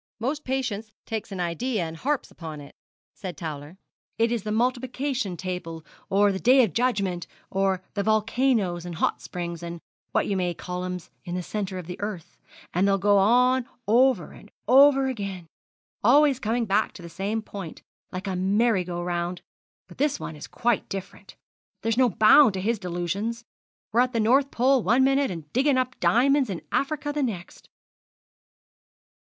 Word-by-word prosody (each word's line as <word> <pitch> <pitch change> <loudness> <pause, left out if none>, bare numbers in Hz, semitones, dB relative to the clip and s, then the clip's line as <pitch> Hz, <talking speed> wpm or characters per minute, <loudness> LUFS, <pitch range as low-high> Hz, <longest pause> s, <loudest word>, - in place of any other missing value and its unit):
'Most 280 +6 -2
patients 240 -5 -3
takes 220 -2 -4
an 190 - -5
idea 185 +5 -1
and 160 0 -5
harps 280 - -2
upon 160 -3 -8
it,' 140 -1 -12 0.4
said 180 -6 -7
Towler. 155 +1 -7 0.4
'It's 230 0 +1
the 210 - -3
multiplication 250 -2 -1
table 170 -4 -5 0.2
or 200 +1 +4
the 190 - -3
day 255 +4 +6
of 205 -9 -1
judgment 200 -8 0 0.2
or 190 -1 0
the 205 - -1
volcanoes 215 -3 +1
and 175 -1 -6
hot - - 0
springs, 170 -1 -5
and 170 0 -6 0.3
what - - +1
you 200 - -1
may 180 -2 -1
call 180 +1 -5
ems, 180 -1 -6
in 175 -1 -5
the 180 - -3
centre 195 0 -4
of 180 - -6
the 180 +3 -8
earth; 205 -5 -5 0.4
and 185 +3 +2
they'll 195 0 +3
go 205 +1 +4
on 250 +4 +4 0.2
over 235 -5 +3
and 205 - -15 0.2
over 270 +2 +6
again 200 -8 -4 0.6
always 275 +3 +5
coming 230 0 0
back 210 +1 +1
to 180 - -11
the - - -7
same 200 +6 -3
point, 195 -6 -8 0.3
like 185 +2 -5
a 190 -2 -2
merry 200 +2 +2
go 175 -1 -4
round; 175 0 -3 0.4
but - - -15
this 290 0 +1
one 155 - -6
is 150 - -9
quite 240 -3 0
different. 195 -1 -8 0.5
There's 225 -1 +1
no 255 0 +4
bounds 220 +4 +6
to 190 - -3
his 225 +2 0
delusions. 195 +6 -3 0.5
We're 230 - +2
at 250 0 +1
the 230 - +1
North 265 +6 +3
Pole 260 +1 +3
one 240 +6 +3
minute, 275 +1 +3
and 165 -4 -8
digging 270 +2 +3
up 255 0 -1
diamonds 270 +1 +3
in 185 -4 -5
Africa 290 +1 -1
the 295 - -1
next.' 205 -10 -5
210 Hz, 175 wpm, -25 LUFS, 180-250 Hz, 0.6 s, day